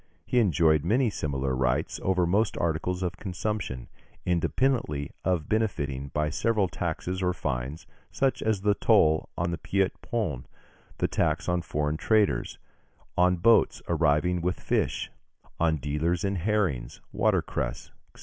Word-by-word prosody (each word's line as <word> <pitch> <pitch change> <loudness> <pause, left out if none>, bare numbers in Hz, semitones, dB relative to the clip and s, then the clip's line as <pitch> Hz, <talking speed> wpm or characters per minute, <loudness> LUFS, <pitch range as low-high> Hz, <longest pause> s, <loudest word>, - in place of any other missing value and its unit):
He 125 - +2
enjoyed 80 - +3
many 120 +1 +2
similar 70 -6 -2
rights 65 -1 0
over 95 -2 +2
most 100 +5 +1
articles 85 +3 -1
of 90 -2 -3
consumption, 95 - -4 0.4
independently 90 - 0
of 90 -5 0
benefiting 70 -11 -1
by 75 +2 -1
several 105 +3 +1
taxes 90 +2 -3
or 90 -1 +1
fines, 75 +1 -4 0.2
such 135 -1 0
as 110 -3 0
the 105 +1 +3
toll 80 -5 +3
on 85 0 0
the 85 - -3
Petit 95 -1 0
Pont, 90 - -3 0.5
the - - +1
tax - - 0
on 90 0 +1
foreign 75 -2 -1
traders, 105 - +1 0.6
on 90 +1 +4
boats 115 +7 +4
arriving 85 +2 +2
with 90 +1 -1
fish, - - -1 0.5
on 80 -1 +2
dealers 75 +5 -1
in 100 -1 0
herrings, 90 - -1
watercress, - - -1 0.2
&c. - - -17
85 Hz, 140 wpm, -27 LUFS, 75-100 Hz, 0.6 s, on